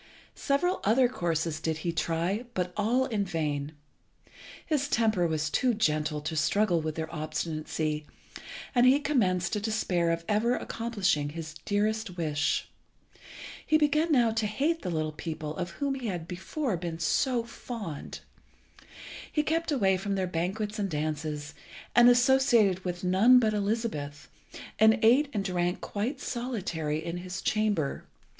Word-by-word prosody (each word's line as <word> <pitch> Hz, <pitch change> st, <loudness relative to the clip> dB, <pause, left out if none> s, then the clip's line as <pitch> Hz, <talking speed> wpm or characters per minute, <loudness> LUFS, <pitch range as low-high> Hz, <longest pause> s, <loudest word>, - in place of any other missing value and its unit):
Several 355 Hz, +7 st, 0 dB
other 245 Hz, +5 st, +4 dB
courses 165 Hz, -8 st, -2 dB
did 160 Hz, -1 st, -2 dB
he 170 Hz, -, +1 dB
try, 170 Hz, +7 st, -1 dB
but 180 Hz, -1 st, -1 dB
all 235 Hz, +5 st, +2 dB
in 220 Hz, -6 st, -1 dB
vain. 155 Hz, -5 st, -2 dB, 0.9 s
His 290 Hz, -3 st, 0 dB
temper 220 Hz, -9 st, +2 dB
was 155 Hz, -1 st, -1 dB
too 250 Hz, -3 st, +2 dB
gentle 155 Hz, -6 st, 0 dB
to 160 Hz, +2 st, -4 dB
struggle 170 Hz, +3 st, +2 dB
with 155 Hz, 0 st, -3 dB
their 160 Hz, 0 st, -5 dB
obstinacy, 155 Hz, -1 st, -3 dB, 0.7 s
and 245 Hz, -1 st, +5 dB
he 270 Hz, +3 st, +6 dB
commenced 190 Hz, -12 st, +1 dB
to 210 Hz, -, +1 dB
despair 200 Hz, -5 st, 0 dB
of 165 Hz, 0 st, -1 dB
ever 225 Hz, +4 st, +2 dB
accomplishing 195 Hz, -10 st, -1 dB
his 155 Hz, 0 st, -7 dB
dearest 210 Hz, -1 st, -1 dB
wish. 150 Hz, -3 st, 0 dB, 1.0 s
He 310 Hz, -, +3 dB
began 305 Hz, +2 st, +2 dB
now 240 Hz, -5 st, +4 dB
to 220 Hz, -1 st, 0 dB
hate 295 Hz, +10 st, 0 dB
the -, -, -3 dB
little 155 Hz, -2 st, -1 dB
people 155 Hz, -1 st, -5 dB
of 175 Hz, -1 st, -3 dB
whom 280 Hz, -1 st, -2 dB
he 260 Hz, -3 st, -4 dB
had 175 Hz, -5 st, -4 dB
before 190 Hz, -, -3 dB
been 165 Hz, -1 st, -4 dB
so 240 Hz, -, +1 dB
fond. 230 Hz, -, -7 dB, 1.1 s
He 300 Hz, -, +1 dB
kept 325 Hz, +1 st, 0 dB
away 195 Hz, -9 st, +3 dB
from 195 Hz, +1 st, -2 dB
their 190 Hz, -1 st, 0 dB
banquets 195 Hz, +5 st, -2 dB
and 200 Hz, -1 st, -1 dB
dances, 150 Hz, -1 st, -3 dB, 0.4 s
and 240 Hz, 0 st, +8 dB
associated 245 Hz, -6 st, +4 dB
with 175 Hz, -1 st, -4 dB
none 195 Hz, +8 st, +6 dB
but 220 Hz, -3 st, +3 dB
Elizabeth, 200 Hz, -9 st, -2 dB, 0.5 s
and 220 Hz, +1 st, +6 dB
ate 265 Hz, +6 st, +5 dB
and 205 Hz, -6 st, -2 dB
drank 175 Hz, -1 st, 0 dB
quite 235 Hz, +7 st, -3 dB
solitary 175 Hz, -, -3 dB
in 170 Hz, +1 st, -3 dB
his 180 Hz, +1 st, -6 dB
chamber. 210 Hz, -10 st, 0 dB
195 Hz, 150 wpm, -28 LUFS, 160-235 Hz, 1.1 s, and